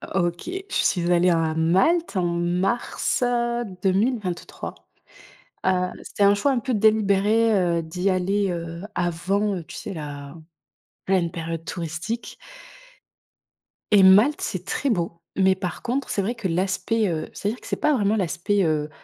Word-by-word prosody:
OK, 175 - -1
je 380 +1 -4
suis 175 -2 +1
allée 175 +1 +4
à 165 -2 +1
Malte 190 - +2
en 180 - +1
mars, 175 +10 0
heu, 240 -1 0 0.2
2023, 195 -2 -1 0.9
heu, 180 -1 +2
c'était - - -4
un 200 0 +6
choix 205 +8 +1
un 250 - 0
peu 255 +2 -2
délibéré, 215 +1 +3
heu, 175 -4 +2
d'y 180 +4 -2
aller, 195 +2 +1
heu, 170 -1 -5
avant, 185 +2 -1
tu - - -10
sais? - - -6
La 145 -3 -7 0.7
pleine 185 -3 +2
période 165 -1 -5
touristique 170 +7 -5 1.6
et 205 -2 +7
Malte, 210 +11 +6
c'est - - -4
très 280 - -1
beau 175 -7 0 0.3
mais 190 0 +4
par 185 -2 -5
contre, 255 +3 -2
c'est 200 - 0
vrai 220 +6 -2
que 215 -6 -3
l'aspect, 190 +5 0
heu 160 -3 -3
c'est-à-dire 210 +4 -3
que - - -12
c'est - - -2
pas 300 - +3
vraiment 215 -2 +1
l'aspect, 195 +2 0
heu, 155 -1 0
190 Hz, 150 wpm, -24 LUFS, 170-215 Hz, 1.6 s, et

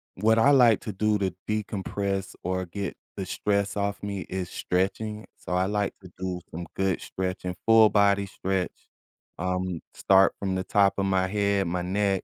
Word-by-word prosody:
what 110 +3 +3
I 140 +5 +6
like 120 -6 +6
to 110 - -5
do 105 +1 +1
to 95 -3 -1 0.2
decompress 100 -2 -2
or 95 +1 -1
get 100 +2 -5 0.2
the 95 - -3
stress 100 +1 0
off 100 -2 -1
me 100 -2 -3
is 90 -1 -3
stretching. 105 +4 -2
So, - - -6
I 90 +1 +2
like 105 0 -1
to 90 -2 -13
do 90 -1 -3
some 85 +2 -5
good 95 0 0
stretching, 90 -1 -4
full-body 105 -3 +5
stretch. 95 -1 -2 0.7
Um, 90 -1 -2
start 95 0 +4
from 95 -2 -1
the 95 - -1
top 100 +1 +3
of 100 - +1
my 95 -1 +2
head, 100 -1 +1
my 90 +1 -1
neck, 95 +1 0
95 Hz, 170 wpm, -26 LUFS, 95-105 Hz, 0.7 s, I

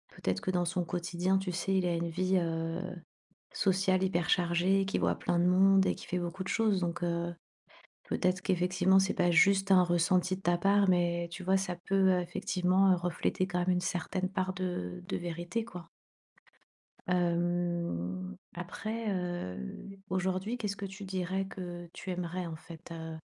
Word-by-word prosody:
peut-être 95 0 -1
que - - -1
dans 175 -1 +1
son 175 +1 -1
quotidien, 180 +2 0
tu 190 -1 -3
sais, 180 +2 -1
il 185 -1 +2
a 170 - +1
une 170 0 -2
vie, 185 +3 +1
heu, 165 -1 -1 0.7
sociale 190 0 +2
hyper 175 -3 0
chargée, 180 +3 +3
qu'il 195 - -1
voit - - +2
plein 175 - 0
de 175 - +3
monde 190 +1 +5
et - - +1
qu'il - - -11
fait 180 - 0
beaucoup 175 +2 -4
de 190 - -6
choses 215 -4 +2
donc 175 0 -2
heu, 170 0 -1 0.7
peut-être 185 0 0
qu'effectivement 185 +1 +3
c'est 190 - +1
pas 175 -1 +2
juste 195 +3 +4
un 185 -1 +7
ressenti 180 +2 +2
de 190 - -13
ta 175 -1 +2
part, 200 +2 +3
mais 175 -1 +1
tu 180 - -6
vois, 190 +2 +3
ça 185 -2 -3
peut 195 -1 +4
effectivement 185 +2 +2
refléter 180 +1 -1
quand 180 -1 -1
même 180 +1 +1
une 180 0 +2
certaine 185 +1 -2
part 185 0 -1
de 90 - -4
de - - -1
vérité, 175 +6 -3
quoi. 180 -7 -9 1.2
Hem, 170 - -1 0.2
après, 215 +5 -4
heu, 175 - -5
aujourd'hui 190 +5 -1
qu'est-ce 205 -3 -2
que 200 - -6
tu 195 +1 -9
dirais 190 0 -2
que 175 -2 -7
tu 185 - -7
aimerais, 180 0 -3
en 165 -1 -5
fait? 165 +1 -12
Heu 160 -1 -6
180 Hz, 175 wpm, -31 LUFS, 175-190 Hz, 1.2 s, un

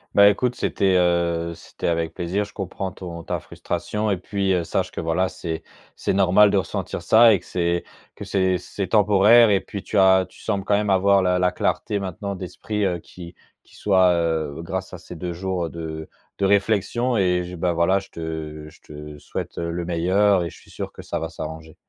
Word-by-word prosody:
Bah, 100 0 +8
écoute, 120 +5 0
c'était, 95 -6 +1
heu, 85 -1 +1
c'était - - -6
avec 85 -1 -1
plaisir. 90 +4 -1
Je 105 - -16
comprends 95 -1 -4
ton 85 -3 -8
ta - - -3
frustration 105 0 -3
et 95 - +1
puis, 95 +1 -1
heu, 90 -2 +1
sache - - -2
que - - -5
voilà, 85 +3 +1
c'est 80 -3 -5 0.3
c'est - - -1
normal 100 +2 +5
de 100 - +2
ressentir 95 - -3
ça 110 +6 +6
et 100 - +2
que - - -20
c'est 85 -1 0 0.3
que - - -9
c'est 95 -2 +1
c'est 95 +1 -5
temporaire 105 +3 +6
et 100 -2 +4
puis 100 - -7
tu 105 - -3
as 95 -1 +5
tu - - -19
sembles 100 -3 -2
quand 105 - +3
même 105 0 +1
avoir 95 0 +4
la 90 0 +2
la 90 0 +2
clarté, 105 - -1
maintenant, 100 +1 -5
d'esprit, 100 +3 -3
heu, 90 -2 -1
qui 85 +1 -12 0.3
qui - - -24
soit, 95 -3 +3
heu, 80 -3 -1
grâce 95 +2 -5
à 90 - -7
ces 90 - -10
2 85 +2 -4
jours, 90 0 -2
heu, - - -5
de 80 -1 -6 0.3
de 100 - +1
réflexion 110 +5 +1
et 90 -2 +2
je 90 +1 -7
bah, 90 0 0
voilà, 85 +3 +2
heu, - - +1
je 95 - -13
te 80 -2 -6
je - - -20
te 75 0 -10
souhaite, - - -6
heu, 85 0 -2
le 85 +1 -3
meilleur 90 +3 +2
et 85 - -4
je - - -14
suis - - -21
sûr - - -6
que - - -11
ça - - -4
va 80 0 -4
s'arranger. 80 -1 -8
90 Hz, 220 wpm, -23 LUFS, 85-100 Hz, 0.3 s, Bah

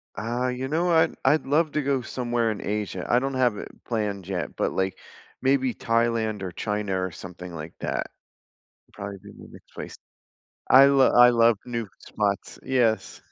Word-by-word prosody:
Uh, 120 +3 -2
you 125 +1 -3
know 165 +5 0
what, 165 -2 +4
I'd 155 -2 +3
love 155 +2 +2
to 150 - 0
go 135 -2 0
somewhere 120 -1 -1
in 105 - -5
Asia. 100 -3 -3
I 120 - +4
don't 135 +2 -1
have 125 -5 +2
it - - -7
planned 105 -5 -3
yet, 90 -3 -4
but - - 0
like, 95 0 -2 0.4
maybe 130 -1 +2
Thailand 115 -3 0
or 90 - -4
China 105 -1 -2
or 95 - -1
something 90 +1 -9
like 80 0 -7
that. - - -2 0.9
Probably 100 -1 -7
be - - -11
my - - -13
next - - -16
place. - - -8 0.7
I 135 +1 +8
lo 135 -2 +5
I 125 0 +7
love 115 -2 +4
new 115 -2 -3
spots. 100 -2 -2
Yes. 115 -6 0
115 Hz, 175 wpm, -25 LUFS, 100-130 Hz, 0.9 s, I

